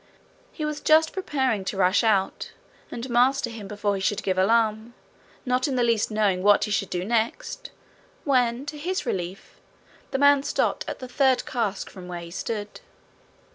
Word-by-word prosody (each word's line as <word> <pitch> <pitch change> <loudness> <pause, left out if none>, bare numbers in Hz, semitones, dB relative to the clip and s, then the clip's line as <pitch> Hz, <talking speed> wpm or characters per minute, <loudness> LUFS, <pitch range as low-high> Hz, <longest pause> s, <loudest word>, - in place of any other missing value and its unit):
He 310 - -4
was 300 -1 -4
just 315 +1 +4
preparing 265 - -1
to 190 +1 -3
rush 185 +3 +3
out, 200 -4 0 0.4
and 235 +2 -6
master 250 +1 +2
him 215 -3 -8
before 205 0 -1
he 195 - -3
should 205 +2 -1
give 190 - 0
alarm, 220 +3 +1 0.5
not 255 +1 +1
in 270 - -2
the 245 - +2
least 230 -3 +1
knowing 210 -4 +1
what 205 +1 +5
he 210 - -2
should 195 -1 0
do 180 0 -3
next, 235 - -2 0.5
when, 250 -2 +1
to 295 0 -6
his 370 +5 -2
relief, 180 +1 -5 0.5
the - - -1
man 285 0 +5
stopped - - -1
at - - -4
the 255 - -8
third 260 0 +2
cask 220 -5 -2
from 185 -2 -11
where 175 -1 -6
he 170 0 -10
stood. 210 +2 -5
230 Hz, 175 wpm, -25 LUFS, 200-265 Hz, 0.5 s, what